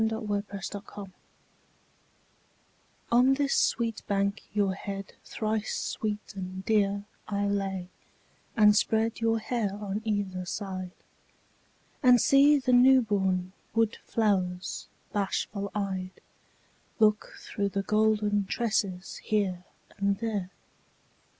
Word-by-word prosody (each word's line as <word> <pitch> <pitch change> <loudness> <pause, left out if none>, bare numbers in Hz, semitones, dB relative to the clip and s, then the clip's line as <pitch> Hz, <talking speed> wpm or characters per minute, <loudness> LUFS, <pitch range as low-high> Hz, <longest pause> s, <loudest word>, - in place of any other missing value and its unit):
YOUTH'S 205 -3 -2
SPRING 205 - -5
TRIBUTE 200 -1 -10 2.0
On 250 +3 +5
this 280 0 +1
sweet 230 -2 +1
bank 200 +1 0
your 205 -2 +1
head 195 0 -6
thrice 215 -1 -2
sweet 210 -1 -3
and 185 0 -6
dear 200 -2 +1 0.2
I 205 -1 -1
lay, 195 -2 -2 0.7
and 210 -1 +7
spread 220 +2 +1
your 225 0 +2
hair 220 -3 -2
on 205 0 -4
either 200 -4 -2
side, 185 -2 -5 1.1
And 250 -3 +6
see 280 +5 +6
the 255 -2 +1
newborn 205 -8 +4 0.2
wood 225 -1 +2
flowers 185 -5 -1 0.3
bashful 200 0 -2
eyed 190 -2 -3 0.8
Look 215 -1 +2
through 200 -1 -3
the 195 0 -2
golden 210 -1 +2
tresses 195 -4 -1
here 190 -4 -1 0.3
and 200 0 +1
there. 210 -5 -2
205 Hz, 105 wpm, -28 LUFS, 195-220 Hz, 2.0 s, and